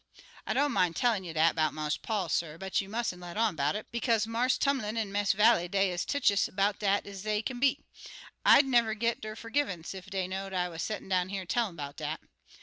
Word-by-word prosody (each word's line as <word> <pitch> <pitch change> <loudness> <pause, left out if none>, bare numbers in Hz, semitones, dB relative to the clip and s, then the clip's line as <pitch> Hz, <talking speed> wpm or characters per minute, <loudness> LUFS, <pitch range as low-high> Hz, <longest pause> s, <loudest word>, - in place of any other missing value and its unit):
I - - -1
don't 285 0 +2
min' 180 -5 +2
tellin' 230 -6 +1
you 175 - -6
dat 160 +1 +3
'bout 155 -1 0
Marse 150 -1 -1
Paul, 210 -5 -2
suh, 160 0 -1
but 190 +2 -1
you 195 - -10
mustn't 215 -5 -3
let 175 +2 -8
on 220 -5 +2
'bout 145 +4 0
it, 210 - -6
bekaze 230 -2 +1
Marse 235 +3 +1
Tumlin 255 -6 0
an' 215 -3 -2
Miss 205 0 +2
Vallie 210 -3 +4
des' 195 +1 +1
ez 175 0 -2
tetchous 225 -9 +2
'bout 200 +1 +1
dat 200 -1 +1
ez 200 -1 -8
dey 215 +1 -1
kin 245 +1 -4
be. 275 +1 +3 0.7
I'd 280 - +7
never 235 -4 +2
git 230 +2 -1
der 215 0 -6
fergivunce 230 - -2
ef 190 +1 -10
dey 190 -2 -2
know'd 190 +1 -5
I 180 -1 0
was 165 -1 -6
settin' 215 - -4
down 185 -1 +1
here 195 -1 -4
tellin' 215 -1 -1
'bout 145 -2 -7
dat. - - -4
200 Hz, 230 wpm, -30 LUFS, 180-230 Hz, 0.7 s, I'd